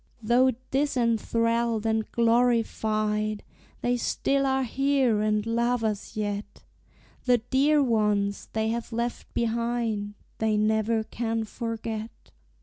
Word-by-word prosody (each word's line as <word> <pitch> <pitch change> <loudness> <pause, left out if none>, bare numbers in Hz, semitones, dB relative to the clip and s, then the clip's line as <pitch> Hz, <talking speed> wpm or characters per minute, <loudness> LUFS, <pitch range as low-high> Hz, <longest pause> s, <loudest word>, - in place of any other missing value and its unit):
Though 250 +4 +4 0.2
disenthralled 230 -4 +1
and 220 -1 0
glorified, 220 -3 +1 0.4
They 245 0 +1
still 275 +3 0
are 265 0 +1
here 265 -3 +1
and 215 0 +1
love 235 +1 0
us 215 -1 -3
yet; 205 -1 -4 0.6
The 250 -1 +5
dear 275 +5 +2
ones 210 -4 +1
they 220 0 0
have 235 +1 -3
left 235 +1 -3
behind 230 -3 -1 0.2
They 220 -1 +1
never 220 +1 +1
can 225 0 -2
forget. 225 -1 -6
230 Hz, 110 wpm, -27 LUFS, 215-245 Hz, 0.6 s, The